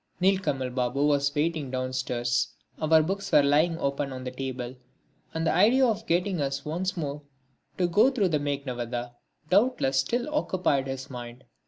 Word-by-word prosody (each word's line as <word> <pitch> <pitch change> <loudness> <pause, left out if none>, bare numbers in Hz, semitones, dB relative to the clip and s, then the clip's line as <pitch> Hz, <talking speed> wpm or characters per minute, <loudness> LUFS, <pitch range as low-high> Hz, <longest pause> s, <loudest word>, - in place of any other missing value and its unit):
Nilkamal 180 -10 +1
Babu 125 +3 0
was 145 0 +2
waiting 155 -2 0
downstairs, 130 -1 -1 0.3
our 160 0 +5
books 195 +4 -3
were 145 - +6
lying 155 +4 +3
open 140 -1 -2
on 130 -1 -6
the 125 - -4
table, 130 -1 -5 0.6
and 160 0 -2
the - - +2
idea 230 +9 +5
of 225 -1 -1
getting 180 -1 +1
us 140 0 -2
once 180 +5 -2
more 145 -2 -3 0.6
to 180 - +2
go 190 +9 +4
through 220 -9 +1
the 155 -3 +1
Meghnadvadha 125 -4 -3 0.4
doubtless 195 - +3
still 240 - 0
occupied 180 - +1
his 135 0 -6
mind. 120 0 -8
145 Hz, 160 wpm, -27 LUFS, 130-180 Hz, 0.6 s, were